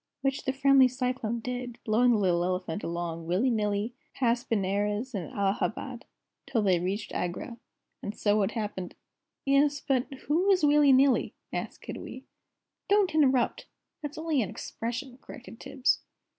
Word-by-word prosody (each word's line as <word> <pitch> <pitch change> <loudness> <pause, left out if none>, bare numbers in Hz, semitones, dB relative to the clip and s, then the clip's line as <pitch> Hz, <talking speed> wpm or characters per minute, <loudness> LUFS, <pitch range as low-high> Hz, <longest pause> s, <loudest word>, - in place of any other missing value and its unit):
Which 270 0 -1
the 265 - +2
friendly 270 -1 +5
Cyclone 250 -2 -2
did, 245 0 -5
blowing 235 +3 +4
the 235 - +4
little 180 -4 +2
elephant 180 0 -2
along, 170 -1 -4
willy 200 +10 +2
nilly, 210 +1 0 0.2
past 240 -1 0
Benares 205 +3 0
and 185 -7 -4
Allahabad, 200 0 -2 0.4
till 230 -5 +1
they 185 -3 +3
reached 195 +5 -3
Agra. 180 +7 -4 0.4
And 205 - -4
it - - -21
so 210 0 +2
happened 205 -5 -4 0.3
" - - -58
"'Es, 280 +1 +3
but 270 0 0
who 345 +7 +2
is 370 -6 +4
Willie 295 -1 +6
Nilly?" 265 0 +4 0.2
asked - - -5
Kiddiwee. 260 - -7 0.7
"Don't 405 -3 +3
interrupt! 265 -5 +2 0.3
That's 295 -1 -6
only 315 -4 +1
an 205 - -2
expression," 245 +6 -5
corrected 240 -4 -11
Tibbs. 265 -1 +1
240 Hz, 150 wpm, -28 LUFS, 205-270 Hz, 0.7 s, Willie